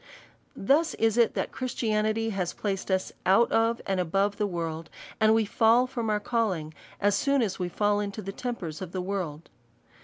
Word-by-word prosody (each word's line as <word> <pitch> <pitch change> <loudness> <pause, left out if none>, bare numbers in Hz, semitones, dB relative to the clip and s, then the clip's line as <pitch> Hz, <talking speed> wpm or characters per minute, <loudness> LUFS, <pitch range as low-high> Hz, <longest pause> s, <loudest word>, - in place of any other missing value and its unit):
Thus 300 +10 +2
it - - -20
is 225 0 +3
that 235 -2 +2
Christianity 225 -3 -1
has 185 -4 -2
placed 195 -2 -3
us 190 -1 0
out 210 +5 +4
of, 230 +1 +2
and 190 -1 0
above 195 +4 0
the 210 - 0
w 170 -3 -2
orld; 160 0 -6 0.3
and 220 0 +5
we 225 -1 +2
fall 225 +4 +4
from 240 -3 -3
our 210 -1 +1
calling, 200 -9 -1 0.3
as 205 0 +3
soon 275 +4 +2
as 195 -4 -3
we 180 -1 -2
fall 205 +3 +1
into 205 +1 -4
the 195 - -4
tempers 195 -9 -5
of 180 -2 -7
the 185 - -2
world. 180 -5 -4
205 Hz, 190 wpm, -27 LUFS, 185-225 Hz, 0.3 s, and